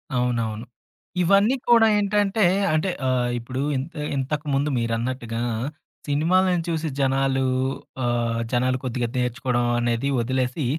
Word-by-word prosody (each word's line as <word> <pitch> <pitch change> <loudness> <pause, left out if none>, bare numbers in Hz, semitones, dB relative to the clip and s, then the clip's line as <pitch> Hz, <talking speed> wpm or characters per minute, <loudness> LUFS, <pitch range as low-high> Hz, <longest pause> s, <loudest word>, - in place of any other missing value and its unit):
అవునవును. 115 -2 -1 0.6
ఇవన్నీ 200 +8 +4
కూడా 230 -2 +7
ఏంటంటే 205 0 +1 0.3
అంటే 155 +5 +1 0.2
ఆహ్ 125 -1 +1
ఇప్పుడు 125 +3 -4 0.2
ఇంత 150 +5 -5 0.2
ఇంతకుముందు 145 +1 -1
మీరన్నట్టుగా, 115 0 -2 0.7
సినిమాలను 175 +4 +2
చూసి 160 -1 -1
జనాలు 135 0 +1 0.6
ఆహ్, 120 -1 0
జనాలు 130 +1 +1
కొద్దిగా 125 -1 -1
నేర్చుకోవడం 125 0 0
అనేది 120 +3 0
వదిలేసి, 130 +3 -1
130 Hz, 105 wpm, -23 LUFS, 120-160 Hz, 0.7 s, కూడా